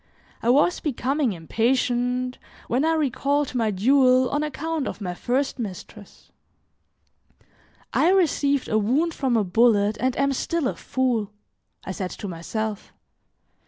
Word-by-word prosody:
I 235 - 0
was 290 +7 +3
becoming 275 -3 -1
impatient 245 +6 0 0.3
when 250 +4 +1
I 325 +1 +2
recalled 285 -1 0
my 230 -3 +1
duel 255 +5 +3
on 290 - 0
account 305 0 -3
of - - -5
my 180 -4 -4
first 260 +8 -1
mistress. 205 -1 -9 1.6
"I 330 - +3
received 290 -7 +2
a 215 - +1
wound 280 +11 +1
from 260 -6 0
a 215 - +2
bullet 210 +1 +3
and 255 +1 0
am 275 0 +2
still 325 +2 -1
a - - -2
fool," 245 -6 -1 0.6
I - - -4
said 185 -1 -4
to 205 - -7
myself. 210 +5 -4
255 Hz, 135 wpm, -24 LUFS, 220-280 Hz, 1.6 s, was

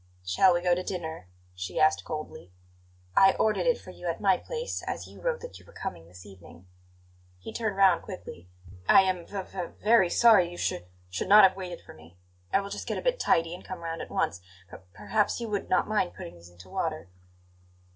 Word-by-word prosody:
"Shall 95 - +4
we 175 - -1
go 180 -1 +3
to 180 - 0
dinner?" 160 - -5 0.3
she 90 0 -5
asked 155 0 +3
coldly. 155 - -7 0.6
"I 195 - +6
ordered 220 - +1
it - - +3
for 185 - -11
you 180 - -8
at 165 - -3
my 195 -2 +4
place, 480 - -5
as - - -4
you - - -14
wrote - - -1
that 485 - -9
you - - -19
were - - -17
coming 135 - -6
this 90 +2 -14
evening." 95 -3 -15 0.7
He 90 - -9
turned 220 -4 -2
round 190 -3 +5
quickly. 90 - -10 0.4
"I - - +8
am 185 -2 -2
v 195 -2 -5
v 185 -1 -5
very 210 -4 +4
sorry; 215 -5 +5
you 175 - -10
sh - - 0 0.4
should 95 - -3
not 210 +1 +9
have 190 -1 +6
waited 180 -2 -7
for - - -14
me! 80 +2 -17 0.3
I 195 - +3
will 200 0 -8
just - - -6
get - - -2
a - - -3
bit - - +1
tidy 165 0 +2
and 180 - -9
come 185 -2 -8
round 165 0 -4
at - - -8
once. 100 - -1 0.3
P - - -9
perhaps 105 - -1
you 235 - -4
would 205 -1 -3
not 185 - +2
mind 210 - 0
putting 85 -3 -8
these 85 0 -15
into 90 +1 -16
water." 155 - -3
180 Hz, 215 wpm, -28 LUFS, -, 0.7 s, not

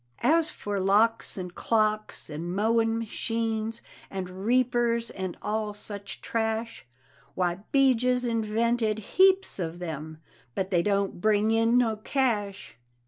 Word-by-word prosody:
As 320 0 +3
for 205 -1 -4
locks 210 +5 +2
and 180 -2 -5
clocks, 215 0 0
and 165 +4 -5
mowin' 225 +2 +2
machines, 225 0 -2 0.3
and 190 +1 -6
reapers, 240 -2 +2
and 185 -2 -5
all 210 0 -2
such 200 -2 -8
trash, 225 - -2 0.5
Why, 180 0 0
'Bijah's 250 -2 +3
invented 225 -1 0
heaps 380 - +3
of 170 -1 -3
them, 160 -2 -6 0.4
but 190 0 -2
they 175 -2 +3
don't 200 -1 0
bring 215 +1 +3
in 225 +2 +3
no 225 -3 +2
cash! 210 - -2
220 Hz, 125 wpm, -27 LUFS, 195-230 Hz, 0.5 s, As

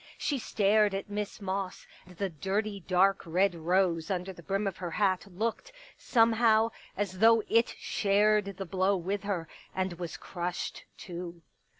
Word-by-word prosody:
She 285 -3 -1
stared 210 -2 +2
at 195 +1 -5
Miss 205 0 -4
Moss, 195 -1 -4 0.2
and 180 -2 -15
the 195 0 -1
dirty 200 +6 -2
dark 190 +2 +3
red 180 +4 +2
rose 170 0 +1
under 190 0 -2
the 170 - -13
brim 195 +4 -1
of 195 -2 -2
her 180 -2 -4
hat 190 +1 +1
looked, 225 - -3 0.2
somehow, 225 -1 +3 0.3
as 190 -2 -2
though 225 0 +6
it 230 +1 +2
shared 205 -1 +2
the 195 - -4
blow 190 +2 +1
with 190 +3 -2
her, 190 -5 -2 0.3
and 185 -1 -1
was 175 -2 -5
crushed, 175 -1 -4
too. 175 -1 -7
195 Hz, 160 wpm, -30 LUFS, 180-210 Hz, 0.3 s, though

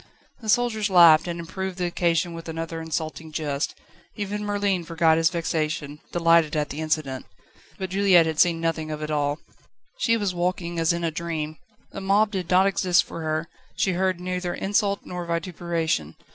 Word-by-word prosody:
The 220 -3 -7
soldiers 220 -3 +2
laughed, 170 -3 +7
and 170 0 -4
improved 185 +2 -5
the 180 - -1
occasion 170 -1 0
with 165 0 -8
another 165 0 -4
insulting 160 0 -4
jest. 145 -2 -2 0.4
Even 205 0 -3
Merlin 205 -3 0
forgot 165 -1 +2
his 165 0 +3
vexation, 155 -3 -2
delighted 165 -2 +3
at 150 -1 0
the 150 - -5
incident. 155 -4 -2 0.5
But 190 -2 -5
Juliette 190 -3 +5
had 160 -1 -2
seen 170 -2 +4
nothing 165 -1 -2
of 155 0 -4
it 155 - -4
all. 145 -1 0 0.6
She 230 - +3
was 200 -4 -1
walking 175 -1 -2
as 165 0 +3
in 170 0 -2
a 165 - 0
dream. 155 -1 -4 0.3
The 195 - -7
mob 205 +2 +3
did 185 -4 -4
not 185 +1 +5
exist 190 -2 +3
for 165 - -8
her; 155 +1 -2 0.3
she 190 - +1
heard 185 0 0
neither 180 0 -3
insult 200 0 0
nor 180 -1 -5
vituperation. 170 - -2
170 Hz, 175 wpm, -24 LUFS, 160-185 Hz, 0.6 s, laughed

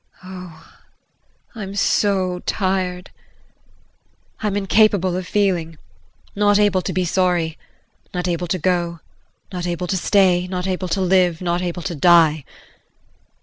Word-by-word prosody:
Oh, 180 -3 -11 0.8
I'm 200 -4 -7
so 190 -3 +1
tired 185 -2 -1 1.3
I'm 205 -2 -1
incapable 200 -2 +2
of 185 0 -4
feeling, 180 -6 0 0.6
not 205 0 +3
able 205 -3 +3
to - - -4
be 185 -1 -1
sorry, 175 -3 0 0.6
not 180 0 -3
able 175 0 -2
to 185 - -1
go, 170 -1 -1 0.5
not 180 -1 -3
able 175 +1 -3
to 190 +2 -1
stay, 185 -1 +3
not 180 0 -4
able 185 -1 -2
to 185 +3 -1
live 180 -2 +2
not 175 -1 -1
able 175 -1 -4
to 185 - -3
die. 160 -2 +4
180 Hz, 130 wpm, -20 LUFS, 175-190 Hz, 1.3 s, die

